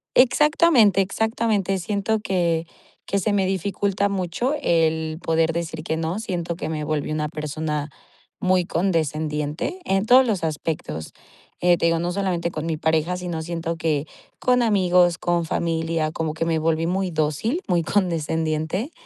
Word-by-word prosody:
Exactamente, 260 - +5
exactamente. 210 -1 0
Siento 205 +4 -1
que 170 -5 0 0.4
que 200 - -1
se 205 +2 0
me 195 -2 +2
dificulta 200 +1 0
mucho 195 - -1
el 160 - +1
poder 165 0 +2
decir 165 -2 -4
que 160 0 -2
no, 165 +5 -2
siento 175 -6 -3
que 170 - -5
me 155 -1 -3
volví 150 0 -2
una 155 0 -1
persona 150 -1 -3 0.5
muy 185 -1 +2
condescendiente 155 - -1
en 195 +2 +1
todos 255 +3 +7
los 200 -7 -1
aspectos, 155 - -3 0.5
eh, 175 0 +4
te 170 - 0
digo, 165 0 +2
no 175 +2 -1
solamente 180 -3 -1
con 155 +1 -4
mi 160 - -1
pareja, 160 +3 +1
sino 175 -3 -4
siento 165 0 -3
que 155 -2 0 0.3
con 250 -1 +2
amigos, 180 -6 +3
con 175 -1 0
familia, 165 -1 -1
como 160 0 -3
que 165 - -1
me 165 -1 +1
volví 160 +1 +1
muy 185 +2 0
dócil, 160 - -1
muy 175 -3 +2
condescendiente. 165 - -1
170 Hz, 155 wpm, -23 LUFS, 160-195 Hz, 0.5 s, todos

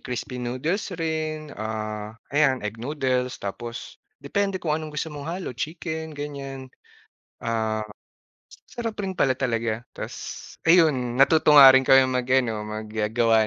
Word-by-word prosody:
crispy 125 0 -5
noodles 130 - -2
rin, 155 -2 -3
ah, 110 0 -5 0.2
ayan 135 -6 +2
egg 110 +2 -5
noodles 130 -2 -1
tapos 115 +4 -7 0.2
depende 195 +5 0
kung 165 -4 -2
anong 155 0 -2
gusto 155 +1 -3
mong 145 +1 -7
halo 175 -5 -4
chicken, 160 +2 -5
ganyan. 135 -2 -7 0.7
Ah, 110 -1 -1 0.9
sarap 230 -2 -4
rin 190 - -2
pala 135 -7 +2
talaga 115 -3 -1
ta's - - -7
ayun 150 -8 +4
natuto 150 +3 +5
nga 135 - +12
rin 130 - +6
kaming 135 -1 +6
mag-ano 125 -4 +1
mag-gawa 110 +1 +1
130 Hz, 130 wpm, -25 LUFS, 115-155 Hz, 0.9 s, nga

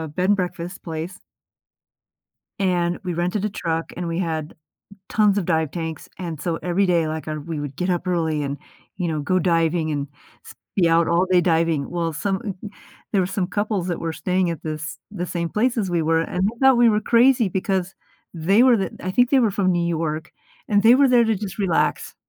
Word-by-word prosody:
uh, 160 - -4
bed 180 +6 0
and 205 - +4
breakfast 180 0 -4
place 165 +2 -5 1.4
and 175 -2 +1
we 180 -2 -3
rented 180 +4 -1
a 210 - 0
truck 165 -3 -3
and 175 -1 -3
we 165 +1 -2
had 160 -3 -3 0.5
tons 210 -2 +3
of 190 - 0
dive 160 -4 0
tanks, 160 -3 -5
and 165 -5 -5
so 165 +1 -1
every 180 +3 +1
day, 170 -3 +2
like, 155 0 -5
uh, 155 - -2
we 165 -2 -4
would 145 -2 -6
get 180 +5 -2
up 180 0 -1
early 160 -4 0
and, 140 0 -3 0.4
you 180 -3 -1
know, 155 -2 -2
go 185 +6 +1
diving 165 -2 +1
and 145 -1 -2 0.4
s - - -12 0.2
be 175 -4 +3
out 165 0 +3
all 170 +2 +3
day 180 -1 +5
diving. 165 -4 +1
Well, 170 -2 -2
some 190 +5 -1
m 200 -5 -4
m 210 - -5 0.4
there 200 - +3
were - - +1
some 190 -2 -2
couples 205 -1 -1
that 175 - -2
were 165 -1 -2
staying 180 +1 0
at 165 - -5
this 155 +1 -5
the 180 -4 -4
same 170 -1 -3
place 240 +3 0
as 200 -4 0
we 175 -1 +1
were, 160 +1 +2
and 180 +2 -2
they 230 +3 -4
thought 265 -2 +5
we 240 -1 +6
were 210 -1 +2
crazy 240 +1 +4
because 190 0 -2 0.4
they 185 +7 +3
were 255 -3 +5
the 195 - -2
I 185 - -3
think 245 +4 +3
they 275 - +4
were 225 -4 +2
from 195 -1 +1
New 175 -1 0
York, 155 -2 -2 0.4
and 205 -1 +3
they 235 +2 +8
were 275 +1 +5
there 245 -1 +5
to 225 -1 +1
just 195 -2 -6
relax. 185 -5 0
175 Hz, 225 wpm, -22 LUFS, 165-200 Hz, 1.4 s, they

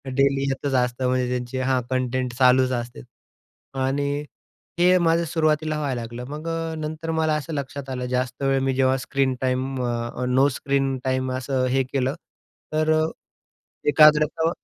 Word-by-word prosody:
Daily 135 0 +3
येतच 135 +1 -2
असतं, 125 0 +1
म्हणजे 125 0 +1
त्यांचे 125 +1 -3
हां. 130 -1 +1
कंटेंट 130 -1 -1
चालूच 130 0 +4
असते. 120 - -4 0.8
आणि 140 +2 -1 0.5
हे 180 +1 +5
माझं 165 0 +3
सुरुवातीला 155 -1 0
व्हायला 135 -5 -2
लागलं. 120 +2 -7
मग 150 +3 -6
अ, 165 0 -2
नंतर 155 +1 -4
मला 160 -1 +1
असं 150 +2 -4
लक्षात 140 -1 -5
आलं, 125 -1 -3
जास्त 125 +1 -2
वेळ 135 0 +2
मी 135 0 +1
जेव्हा 130 0 +3
स्क्रीन 135 0 0
टाईम 130 0 -1
अ, 120 +1 -3
नो 130 +2 +4
स्क्रीन 135 -1 0
टाईम 130 -1 -1
असं 130 0 -1
हे 135 +1 +2
केलं, 130 +1 -1 0.6
तर 155 0 +2 1.0
एकाग्रता 155 +2 +5
135 Hz, 150 wpm, -23 LUFS, 130-150 Hz, 1.0 s, हे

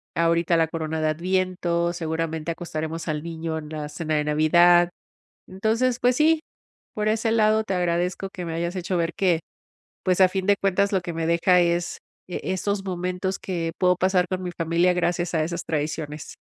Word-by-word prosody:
ahorita 170 +1 +2
la 165 -1 +2
corona 160 -1 -3
de 155 - +2
adviento, 175 0 0
seguramente 160 -1 -3
acostaremos 160 -1 -5
al 150 -1 -1
niño 165 0 -4
en 155 -1 -7
la 150 -1 -5
cena 155 +1 -3
de 150 - +1
Navidad. 175 +4 +5 0.5
Entonces, 225 +6 0
pues 250 0 +3
sí, 315 +3 +4 0.5
por 215 0 0
ese 225 +1 +1
lado, 220 -1 +3
te 195 - -2
agradezco 180 +1 -1
que 180 -3 -6
me 165 - -4
hayas 170 +3 -2
hecho 180 +1 -2
ver 170 -1 0
que, 180 -4 +2 0.7
pues, 185 0 +2
a 185 - +7
fin 190 0 -2
de 200 0 +4
cuentas, 200 +1 +1
lo 190 - +2
que 175 -1 -6
me 165 0 -2
deja 170 +2 +4
es, 175 0 0 0.3
e 180 - -3
esos 195 +1 -2
momentos 185 0 -2
que 170 -3 -3
puedo 180 0 +3
pasar 185 0 +2
con 185 0 -3
mi 180 - -3
familia 170 +2 +2
gracias 175 0 0
a 160 - +2
esas 170 +1 -4
tradiciones. 150 -1 -4
175 Hz, 185 wpm, -24 LUFS, 165-185 Hz, 0.7 s, a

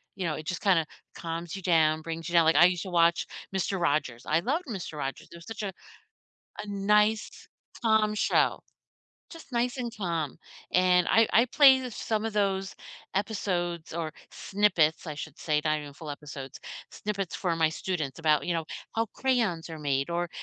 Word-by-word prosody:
you 190 -2 -3
know, 155 -2 -1
it 155 - -7
just 180 - -3
kinda 180 -6 +3 0.3
calms 165 0 -5
you - - -7
down, 160 -3 +3
brings 165 +1 -5
you - - -7
down, 170 -1 +6
like, 160 - +4
I 165 +4 +8
used 180 -1 +1
to 190 - -7
watch 170 0 +3 0.3
Mister 195 0 -1
Rogers, 145 -7 0
I 155 +2 +2
loved 295 - 0
Mister 190 -9 -5
Rogers, 135 -2 -4
it 170 - -10
was 170 - -13
such 225 -1 -6
a 195 -2 -3 0.9
a - - -9
nice, 210 +2 +1 0.3
calm, 220 -2 +3
show. 210 - +2 0.7
Just 330 -3 -12
nice 245 +2 0
and 240 -1 -2
calm, 170 -8 -2 0.4
and 180 -1 +4
I 225 0 +5
I 230 +3 +5
play 265 +1 +7
the 255 -1 -5
some 220 -1 -2
of 225 - -4
those 195 -2 0 0.4
episodes 180 -6 -2
or 165 -2 -3 0.2
snippets, 185 -6 +1
I 155 - -4
should 145 - -8
say- 150 -2 +1
not 155 0 +2
even 145 -1 -9
full 155 +1 -8
episodes- 140 -2 -8 0.3
snippets 200 -3 -4
for 170 -3 -1
my 160 -1 +3
students 155 -4 -3
about, 155 -2 +2
you 175 - +1
know, 165 -1 -2 0.3
how 225 0 +1
crayons 225 -11 0
are 160 - -6
made, 140 0 -1
or 175 +1 -1
175 Hz, 190 wpm, -28 LUFS, 160-210 Hz, 0.9 s, I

